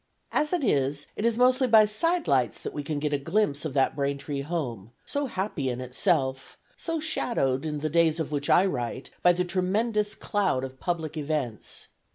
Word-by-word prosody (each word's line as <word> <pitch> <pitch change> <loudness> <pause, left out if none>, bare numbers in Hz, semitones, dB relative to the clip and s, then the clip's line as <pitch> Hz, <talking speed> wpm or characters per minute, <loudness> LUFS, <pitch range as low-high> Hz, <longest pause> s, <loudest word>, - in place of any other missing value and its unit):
As 300 - +1
it 355 -5 0
is, 140 - +1
it 210 - -2
is 235 -1 +2
mostly 255 +1 +4
by 220 -2 +7
side 330 +12 0
lights 125 -5 +2
that - - -5
we 145 - -3
can 145 +1 -3
get 150 0 -1
a 145 - +1
glimpse 165 -1 0
of 145 -3 -4
that 135 -1 +2
Braintree 140 0 -2
home, 125 - -4
so 285 -1 -2
happy 190 - -2
in 125 0 -3
itself, 130 0 0 0.2
so 330 -1 -3
shadowed, 160 - 0
in 150 -2 -3
the 155 - 0
days 165 0 +3
of 155 -2 -3
which 145 -1 -2
I 185 - +6
write, 130 -6 -3
by 180 - +6
the 180 +1 0
tremendous 205 +4 0
cloud 190 -11 0
of 130 0 -7
public 160 -3 -3
events. 145 -7 -4
155 Hz, 195 wpm, -27 LUFS, 140-210 Hz, 0.2 s, by